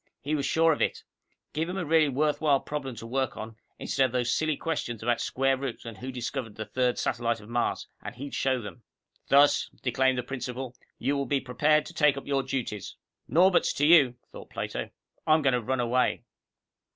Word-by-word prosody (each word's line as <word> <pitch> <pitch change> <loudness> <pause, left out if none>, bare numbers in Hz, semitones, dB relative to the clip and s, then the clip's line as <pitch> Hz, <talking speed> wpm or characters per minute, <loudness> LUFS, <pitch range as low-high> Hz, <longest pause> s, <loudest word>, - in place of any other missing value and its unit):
He 145 +3 -3
was 145 -2 0
sure 165 0 +4
of - - -5
it. - - 0 0.5
Give 160 +3 -1
him 185 - -3
a 180 - -2
really 155 -1 +4
worthwhile 145 +1 +2
problem 135 -4 -5
to 115 - -8
work 130 +2 -2
on, 110 +1 -7 0.2
instead 135 - +1
of 125 - -12
these 120 -1 +1
silly 155 -2 0
questions 120 -9 -3
about 120 0 +1
square 135 +1 +1
roots 130 -3 -5
and 115 -4 -8
who 130 +1 -5
discovered 125 -2 -4
the 110 - -5
third 125 +1 0
satellite 115 -2 -1
of 105 +1 -14
Mars, 120 0 -1 0.2
and - - -7
he'd 140 +3 -7
show 130 -1 +1
them. 115 +2 -9 0.5
"Thus," 140 +1 +5
declaimed 130 +1 +2
the 125 - -1
principal, 125 0 -5 0.2
"you 145 - 0
will 140 -1 -1
be 140 - +1
prepared 150 +4 +2
to - - -10
take 150 -2 +3
up 140 - -6
your 140 -1 +1
duties 130 -6 -4 0.2
" - - -45
"Norberts 180 +5 +4
to 145 - +2
you," 150 -6 +6 0.2
thought - - -11
Plato. - - -4 0.4
"I'm 155 0 +4
going 135 -2 +3
to 125 - +1
run 130 +3 -1
away." 125 +1 +1
130 Hz, 205 wpm, -28 LUFS, 120-145 Hz, 0.5 s, you